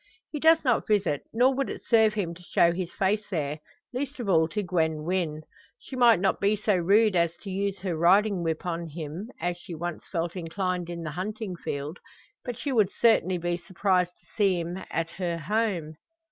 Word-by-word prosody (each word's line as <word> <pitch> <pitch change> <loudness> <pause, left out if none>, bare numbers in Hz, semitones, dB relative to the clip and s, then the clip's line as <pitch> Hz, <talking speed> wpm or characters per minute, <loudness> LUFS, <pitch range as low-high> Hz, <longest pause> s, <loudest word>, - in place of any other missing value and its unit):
He 300 - -3
does 320 +1 +5
not 245 -3 +2
visit, 200 -9 +1
nor 250 +4 +4
would 275 +1 -1
it - - -7
serve 220 -2 +4
him 180 -5 -2
to 175 - -14
show 170 -1 +3
his 175 0 -4
face 210 +2 0
there 150 -5 -2 0.3
least 275 +2 -4
of 235 - -4
all 160 -4 +4
to 210 +5 -3
Gwen 160 -4 0
Wynn. 165 -3 -1 0.3
She 265 - -10
might 240 -6 +6
not 190 +1 +1
be 200 +2 +3
so 210 -1 +1
rude 200 +4 +4
as 170 -1 +1
to 195 - -6
use 195 0 -2
her 185 -3 -2
riding 190 +4 +4
whip 165 0 -2
on 170 -1 -3
him, 160 +6 -6
as 175 +1 -1
she 175 -1 -8
once 175 +1 -5
felt 170 -1 -2
inclined 180 0 -2
in 170 -1 -5
the 155 - -4
hunting 195 +3 -4
field; 145 0 -5 0.4
but 245 -2 -5
she 280 - -3
would 215 -7 +3
certainly 190 -6 +3
be 175 0 -1
surprised 180 0 0
to - - -30
see 195 -4 +3
him 170 +2 -4
at 165 +1 -2
her 170 -2 -2
home. 170 -3 -1
180 Hz, 200 wpm, -27 LUFS, 170-210 Hz, 0.4 s, might